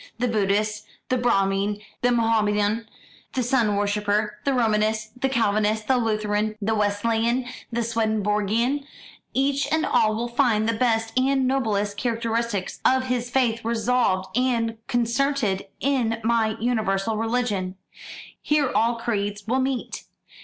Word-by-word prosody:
The 250 Hz, +1 st, 0 dB
Buddhist, 210 Hz, -1 st, 0 dB, 0.2 s
the 255 Hz, -, +2 dB
Brahmin, 200 Hz, -3 st, +1 dB, 0.2 s
the 245 Hz, -, +3 dB
Mohamedan, 220 Hz, -1 st, +1 dB, 0.5 s
the 255 Hz, -, 0 dB
Sun 235 Hz, -4 st, +2 dB
worshipper, 210 Hz, +1 st, 0 dB
the 275 Hz, -, +2 dB
Romanist, 215 Hz, 0 st, 0 dB
the 270 Hz, -, +2 dB
Calvinist, 215 Hz, -3 st, +1 dB
the 260 Hz, -, +3 dB
Lutheran, 215 Hz, -2 st, 0 dB
the 220 Hz, +1 st, 0 dB
Wesleyan, 225 Hz, +4 st, +1 dB, 0.3 s
the 235 Hz, 0 st, -1 dB
Swedenborgian 220 Hz, +3 st, 0 dB, 0.5 s
each 275 Hz, +2 st, +1 dB
and 315 Hz, 0 st, +2 dB
all 215 Hz, 0 st, +2 dB
will 235 Hz, +2 st, -2 dB
find 235 Hz, -3 st, +2 dB
the 230 Hz, -, +2 dB
best 225 Hz, -1 st, 0 dB
and 265 Hz, 0 st, +2 dB
noblest 210 Hz, -6 st, 0 dB
characteristics 230 Hz, -4 st, -2 dB
of 260 Hz, 0 st, +3 dB
his 245 Hz, -1 st, -1 dB
faith 240 Hz, -3 st, +1 dB
resolved 225 Hz, -5 st, 0 dB
and 230 Hz, -3 st, +1 dB
concentred 240 Hz, -4 st, 0 dB
in 245 Hz, -5 st, 0 dB
my 225 Hz, -1 st, +1 dB
universal 220 Hz, -3 st, 0 dB
religion. 220 Hz, -5 st, -1 dB, 0.7 s
Here 295 Hz, -3 st, +1 dB
all 235 Hz, +1 st, +2 dB
creeds 205 Hz, -3 st, -3 dB
will 255 Hz, +4 st, +1 dB
meet. 265 Hz, -1 st, -3 dB
225 Hz, 130 wpm, -24 LUFS, 210-245 Hz, 0.7 s, the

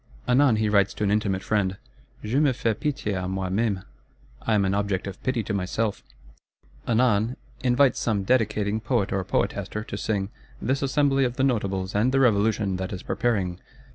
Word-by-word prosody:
Anon 125 Hz, -1 st, +4 dB
he 110 Hz, 0 st, +1 dB
writes 100 Hz, -2 st, +2 dB
to -, -, -3 dB
an 100 Hz, -, +2 dB
intimate 100 Hz, -3 st, 0 dB
friend, 100 Hz, -3 st, 0 dB, 0.5 s
'Je 115 Hz, +6 st, +1 dB
me 150 Hz, -1 st, +4 dB
fais 115 Hz, -2 st, 0 dB
pitié 130 Hz, -6 st, -2 dB
à 90 Hz, -1 st, -2 dB
moi 95 Hz, 0 st, -2 dB
même 100 Hz, -2 st, 0 dB, 0.6 s
(I 110 Hz, -, +1 dB
am 100 Hz, -2 st, +3 dB
an 95 Hz, -, +1 dB
object 100 Hz, -2 st, -1 dB
of 100 Hz, -1 st, -7 dB
pity 130 Hz, -3 st, -1 dB
to 105 Hz, -, -3 dB
myself);' 100 Hz, +3 st, -1 dB, 0.9 s
anon, 115 Hz, 0 st, +2 dB, 0.3 s
invites 125 Hz, +1 st, +3 dB
some 105 Hz, -4 st, 0 dB
dedicating 105 Hz, -2 st, +1 dB
Poet 110 Hz, -2 st, 0 dB
or 95 Hz, -1 st, 0 dB
Poetaster 105 Hz, +3 st, -2 dB
to -, -, -6 dB
sing 100 Hz, -3 st, -1 dB, 0.3 s
"this 135 Hz, +5 st, -1 dB
Assembly 135 Hz, 0 st, +2 dB
of 125 Hz, -1 st, -1 dB
the 135 Hz, -, 0 dB
Notables 100 Hz, -7 st, 0 dB
and 110 Hz, +5 st, +2 dB
the 135 Hz, -, +2 dB
Revolution 105 Hz, -5 st, +2 dB
that 95 Hz, +1 st, -4 dB
is 95 Hz, -3 st, -6 dB
preparing." 95 Hz, -7 st, -1 dB
105 Hz, 180 wpm, -25 LUFS, 100-125 Hz, 0.9 s, Anon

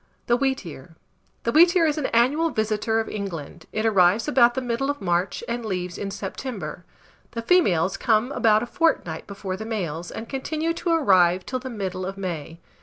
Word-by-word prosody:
THE 240 Hz, -, +3 dB
WHEATEAR. 190 Hz, -, -3 dB, 0.5 s
The 230 Hz, -, 0 dB
wheatear 340 Hz, +3 st, +6 dB
is 305 Hz, -1 st, +1 dB
an 275 Hz, -, 0 dB
annual 280 Hz, +8 st, +2 dB
visitor 220 Hz, -2 st, 0 dB
of 225 Hz, -, -2 dB
England: 170 Hz, -6 st, -6 dB
it 215 Hz, +1 st, -2 dB
arrives 200 Hz, +1 st, +4 dB
about 240 Hz, -5 st, +4 dB
the -, -, 0 dB
middle 250 Hz, +2 st, -1 dB
of 285 Hz, -, -2 dB
March 175 Hz, -1 st, -1 dB
and 235 Hz, 0 st, -3 dB
leaves 180 Hz, -4 st, -3 dB
in 200 Hz, -, -4 dB
September. 200 Hz, 0 st, -6 dB, 0.5 s
The 230 Hz, -1 st, -4 dB
females 195 Hz, -, +3 dB
come 230 Hz, +2 st, +2 dB
about 220 Hz, -4 st, +3 dB
a -, -, -2 dB
fortnight 240 Hz, -, 0 dB
before 195 Hz, -2 st, -5 dB
the 220 Hz, -, -6 dB
males, 175 Hz, -7 st, -4 dB
and 225 Hz, -, -7 dB
continue 310 Hz, +5 st, -2 dB
to 340 Hz, +1 st, -3 dB
arrive 185 Hz, -, +4 dB
till 255 Hz, -, -3 dB
the 260 Hz, +1 st, -7 dB
middle 190 Hz, -5 st, -4 dB
of 195 Hz, 0 st, -6 dB
May. 165 Hz, -4 st, -5 dB
220 Hz, 180 wpm, -24 LUFS, 185-260 Hz, 0.5 s, wheatear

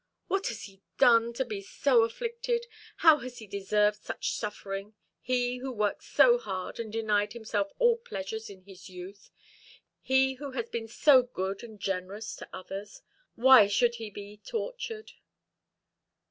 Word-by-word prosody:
"What 390 Hz, 0 st, -1 dB
has 225 Hz, -2 st, -5 dB
he 195 Hz, -1 st, -12 dB, 0.2 s
done 230 Hz, -1 st, +5 dB
to 265 Hz, +2 st, -1 dB
be 210 Hz, -4 st, -5 dB
so 240 Hz, +5 st, +3 dB
afflicted? 470 Hz, -, -2 dB, 0.4 s
how 315 Hz, -2 st, +8 dB
has 250 Hz, -1 st, -8 dB
he 220 Hz, -, -9 dB
deserved 210 Hz, +1 st, +1 dB
such -, -, -3 dB
suffering, 205 Hz, -1 st, -5 dB, 0.3 s
he 250 Hz, 0 st, 0 dB
who 265 Hz, +1 st, -4 dB
worked 210 Hz, -4 st, -1 dB
so 485 Hz, 0 st, +5 dB
hard, 185 Hz, -, -5 dB
and 225 Hz, -2 st, -5 dB
denied 210 Hz, -2 st, 0 dB
himself 215 Hz, -4 st, -2 dB
all 480 Hz, -1 st, +4 dB
pleasures 220 Hz, -, -6 dB
in 190 Hz, -2 st, -13 dB
his 190 Hz, -1 st, -13 dB
youth 185 Hz, +2 st, -10 dB, 0.7 s
he 265 Hz, 0 st, +3 dB
who 275 Hz, 0 st, -8 dB
has 235 Hz, -3 st, -3 dB
been 230 Hz, -1 st, -4 dB
so 260 Hz, +3 st, +6 dB
good 195 Hz, -6 st, -4 dB
and 220 Hz, -3 st, -11 dB
generous 195 Hz, +3 st, -4 dB
to -, -, -10 dB
others? 195 Hz, +2 st, -8 dB, 0.3 s
Why 250 Hz, -3 st, +8 dB
should 235 Hz, +4 st, +2 dB
he 220 Hz, -, -5 dB
be 205 Hz, +1 st, -10 dB
tortured?" 450 Hz, -, -5 dB
225 Hz, 155 wpm, -29 LUFS, 200-260 Hz, 0.7 s, how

